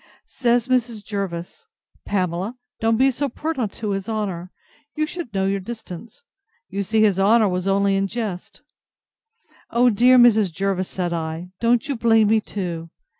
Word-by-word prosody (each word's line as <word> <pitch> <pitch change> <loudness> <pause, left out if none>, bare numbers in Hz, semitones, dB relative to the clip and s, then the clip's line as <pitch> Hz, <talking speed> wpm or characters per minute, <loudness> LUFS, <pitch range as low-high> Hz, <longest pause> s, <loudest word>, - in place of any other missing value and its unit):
Says 240 -2 +2
Mrs. 240 -4 0
Jervis, 195 - -5 0.4
Pamela, 185 +4 -1 0.2
don't 225 0 +2
be 265 +2 +4
so 280 +3 -2
pert 260 -5 -3
to 215 -3 -4
his 195 +1 -3
honour: 195 -5 -3 0.5
you 310 0 +1
should 325 -5 -6
know 195 -1 0
your 195 +1 0
distance; 225 - -9 0.5
you 200 - -3
see 215 +3 +2
his 200 -3 +3
honour 215 +3 +5
was 180 0 -2
only 195 0 +2
in 195 0 +1
jest.—O 240 - -4
dear 245 +4 +5
Mrs. 220 -6 +5
Jervis, 190 +1 -1
said 175 -2 -2
I, 165 +2 -4
don't 235 0 +2
you 280 - -1
blame 225 -2 +4
me 220 0 +4
too. 170 -6 -5
210 Hz, 155 wpm, -22 LUFS, 190-240 Hz, 0.5 s, honour